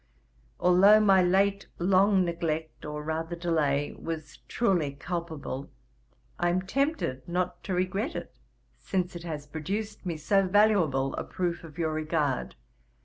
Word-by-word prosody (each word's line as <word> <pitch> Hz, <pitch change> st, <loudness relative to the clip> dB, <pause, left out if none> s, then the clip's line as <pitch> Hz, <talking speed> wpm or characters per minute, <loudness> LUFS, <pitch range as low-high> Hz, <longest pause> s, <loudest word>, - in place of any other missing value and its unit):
Although 195 Hz, +4 st, +6 dB
my 195 Hz, -3 st, +5 dB
late 195 Hz, +2 st, +2 dB
long 190 Hz, +1 st, +4 dB
neglect, 160 Hz, -3 st, -3 dB
or 150 Hz, 0 st, -5 dB
rather 160 Hz, +2 st, -3 dB
delay, 155 Hz, -4 st, 0 dB
was 155 Hz, -3 st, -6 dB
truely 175 Hz, -11 st, +1 dB
culpable, 160 Hz, -4 st, -5 dB, 0.7 s
I 175 Hz, -, +2 dB
am 185 Hz, +1 st, 0 dB
tempted 270 Hz, -, -1 dB
not 180 Hz, +1 st, -2 dB
to 190 Hz, -, -1 dB
regret 195 Hz, -, -1 dB
it, -, -, -6 dB, 0.5 s
since 180 Hz, -2 st, -2 dB
it 170 Hz, -, -6 dB
has 155 Hz, -4 st, -5 dB
produced 195 Hz, +8 st, -4 dB
me 170 Hz, -4 st, -3 dB
so 195 Hz, +5 st, +2 dB
valuable 180 Hz, -10 st, +3 dB
a -, -, -2 dB
proof 175 Hz, -2 st, -3 dB
of 160 Hz, -1 st, -12 dB
your 160 Hz, -2 st, 0 dB
regard. 155 Hz, -4 st, -1 dB
175 Hz, 140 wpm, -28 LUFS, 155-190 Hz, 0.7 s, Although